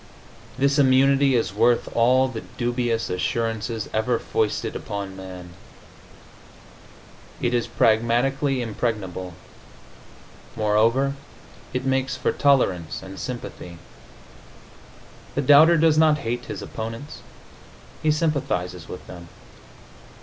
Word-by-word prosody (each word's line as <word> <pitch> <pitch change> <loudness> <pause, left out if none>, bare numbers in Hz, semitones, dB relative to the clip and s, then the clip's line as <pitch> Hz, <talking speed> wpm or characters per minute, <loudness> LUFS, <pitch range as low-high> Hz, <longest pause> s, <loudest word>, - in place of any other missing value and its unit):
This 140 +2 +2
immunity 135 0 +4
is 115 -4 0
worth 115 +3 +2
all 125 +3 +4
the 115 -4 -6 0.2
dubious 120 -2 -1
assurances 115 +3 -2
ever 110 +2 +1
foisted 110 -2 -2
upon 100 -2 -5
man. 90 -2 -9 1.9
It 120 - 0
is 120 -1 0
pragmatically 125 +4 +1
impregnable.... 100 -6 -4 1.2
Moreover, 115 +6 +2 0.6
it 130 +1 -3
makes 130 -1 0
for 130 - 0
tolerance 95 - +1
and 95 0 -9
sympathy. 105 -8 -7 1.6
The 145 - 0
doubter 155 +5 +7
does 155 -1 +4
not 155 -1 +5
hate 120 +2 -2
his - - -6
opponents; 115 +5 -7 0.8
he 155 - +1
sympathizes 130 - -1
with 90 - -8
them. 85 -1 -11
120 Hz, 100 wpm, -23 LUFS, 105-135 Hz, 1.9 s, doubter